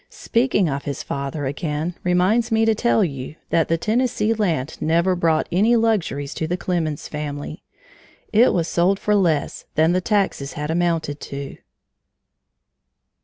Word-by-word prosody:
Speaking 230 -6 +1
of 140 -1 -3
his 140 -2 -4
father 140 +1 -4
again 150 +4 -2
reminds 185 +7 +2
me 225 0 +3
to 225 - +4
tell 225 0 +2
you 140 -3 -4 0.2
that 165 - +3
the 165 - +1
Tennessee 225 +2 +1
land 165 - -2
never 170 +4 +2
brought 165 -3 +1
any 215 +7 +3
luxuries 200 -12 0
to 160 - -3
the 175 +2 -1
Clemens 170 -4 -2
family. 145 -1 -5 0.7
It 230 +4 +6
was 170 -2 0
sold 180 +4 +2
for 210 - 0
less 170 -8 +1
than 160 +2 +4
the 185 +1 +1
taxes 195 -9 0
had 150 +1 -3
amounted 165 -4 0
to. 140 0 -7
170 Hz, 150 wpm, -22 LUFS, 150-210 Hz, 0.7 s, It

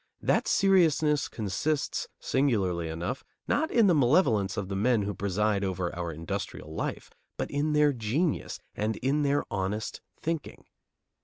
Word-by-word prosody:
That - - +2
seriousness 160 -6 +3
consists, 115 +8 -2
singularly 95 -11 +1
enough, 90 +11 -4 0.2
not 315 +2 +1
in 230 -3 +4
the 185 - +5
malevolence 120 - +3
of 100 - -2
the 95 - -4
men 110 +2 +2
who 105 +1 -2
preside 100 +1 0
over 95 -2 -2
our 85 -1 -3
industrial 80 -1 -5
life, - - -4 0.3
but - - -3
in 150 +2 0
their 150 -1 +4
genius 130 +8 -1
and 110 +1 -1
in 140 +6 0
their 145 0 +2
honest 100 +2 -2 0.2
thinking. 165 -2 -4
110 Hz, 145 wpm, -28 LUFS, 95-150 Hz, 0.3 s, the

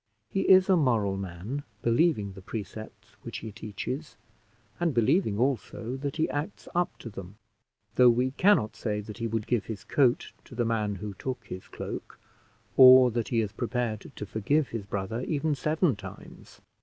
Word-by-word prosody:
He 195 - 0
is 185 0 +7
a 190 - +5
moral 115 - +2
man, 95 +8 -5 0.2
believing 115 - +2
the 95 - -11
precepts 110 +2 -8
which - - -6
he 110 - -5
teaches, 110 +9 -6 0.6
and 170 -5 0
believing 120 - +2
also 125 -1 -1
that 140 0 -4
he 160 - +1
acts 150 +8 -4
up 175 0 0
to 115 - -8
them; 95 0 -9 0.6
though 125 -1 +8
we 125 +2 +2
cannot 180 - +3
say 105 -2 -2
that 105 +2 -8
he 115 - -1
would 110 -1 -2
give 120 -5 0
his 110 -3 -6
coat 140 +2 +2
to 125 - -12
the 120 0 0
man 105 -3 0
who 100 +2 -6
took 130 +7 -5
his 95 - -8
cloak, - - -7 0.6
or 130 -1 +9
that 115 -2 -1
he 115 +1 +1
is 105 -3 -3
prepared 120 -3 -3
to - - -5
forgive 130 +9 0
his 110 -4 -5
brother 100 +4 -3
even 150 +2 0
seven 155 - +1
times. 95 -2 -12
115 Hz, 175 wpm, -28 LUFS, 105-140 Hz, 0.6 s, or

